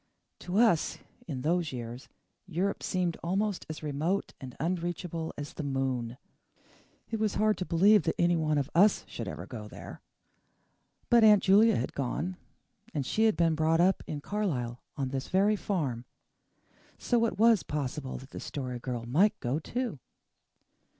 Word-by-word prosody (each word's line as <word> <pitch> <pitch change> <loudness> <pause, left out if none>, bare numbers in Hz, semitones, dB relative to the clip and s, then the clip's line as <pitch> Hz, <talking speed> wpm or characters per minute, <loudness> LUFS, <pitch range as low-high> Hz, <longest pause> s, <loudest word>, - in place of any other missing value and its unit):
To 180 +2 -3
us, 220 -9 +3 0.3
in 135 -6 -4
those 170 0 +1
years, 120 0 -7 0.4
Europe 190 +3 -1
seemed 180 -3 -1
almost 195 +3 -1
as 155 0 -6
remote 155 +6 -1
and 130 -2 -8
unreachable 170 0 -2
as 145 0 -6
the - - -5
moon. 130 -3 -2 0.9
It 225 - -1
was 215 -2 0
hard 215 0 +3
to 185 - -2
believe 200 +5 +5
that 160 - 0
one 160 -3 +2
of 140 -2 0
US 200 +5 +5
should - - -6
ever - - -6
go - - -8
there. - - -10 1.1
But 235 -1 +7
Aunt 210 -2 +7
Julia 210 +4 +6
had 125 - -2
gone 160 +7 -3 0.6
and 140 -3 -1
SHE 220 - +2
had 220 - +3
been 165 -1 +3
brought 160 +1 +2
up 185 +2 +3
in 145 -1 -4
Carlisle 140 - -2 0.2
on 135 -2 -1
this 135 0 -3
very 200 +3 +3
farm. 145 - -2 0.9
So 235 -2 +2
it 195 - -5
was 225 -2 +5
possible 140 -2 -4
that 135 +2 -12
the - - -7
Story 125 -3 -5
Girl 120 -2 -4
might 180 - +3
go 130 +5 -1
too. 240 - -3
165 Hz, 160 wpm, -29 LUFS, 135-200 Hz, 1.1 s, But